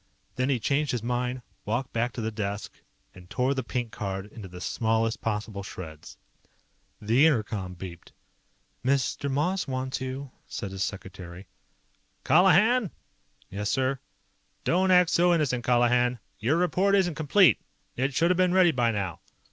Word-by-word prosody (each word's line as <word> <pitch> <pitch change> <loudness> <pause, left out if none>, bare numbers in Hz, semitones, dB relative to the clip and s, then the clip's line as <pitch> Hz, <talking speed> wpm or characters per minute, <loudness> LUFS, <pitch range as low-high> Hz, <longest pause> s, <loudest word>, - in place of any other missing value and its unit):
Then 130 +2 0
he 130 -3 +1
changed 140 +5 0
his 120 -3 -2
mind, 125 +1 -2 0.2
walked 120 +5 -2
back 115 +2 0
to 120 - -5
the 110 0 -2
desk, 105 -1 -4 0.4
and 90 -1 -15
tore 130 +2 +1
the 135 - -2
pink 120 -1 -3
card 95 -1 -4
into 105 -4 -9
the 90 0 -10
smallest 110 +2 0
possible 105 -2 -3
shreds. 80 -5 -9 0.8
The 120 +8 +4
inter 130 -9 +2
com 95 -4 -5
beeped. 90 -1 -9 0.7
"Mr. 140 +1 0
Moss 155 +8 0
wants 130 0 -3
you," 130 +1 -5 0.2
said 100 -4 -5
his 95 0 -6
secretary. 95 -2 -7 0.8
"Colihan!" 195 +6 +5 0.6
"Yes, 105 +2 -3
sir?" 130 0 0 0.6
"Don't 185 +2 +2
act 180 -2 +5
so 175 0 +4
innocent, 125 -7 0
Colihan. 120 0 +3 0.2
Your 130 +9 +1
report 185 +3 +2
isn't 185 -4 +2
complete. 160 +5 +4 0.4
It 130 +2 -1
should 170 +4 +3
have 180 - +1
been 185 0 +3
ready 180 -2 +6
by 120 -5 +1
now." 100 -7 -2
125 Hz, 155 wpm, -27 LUFS, 105-150 Hz, 0.8 s, ready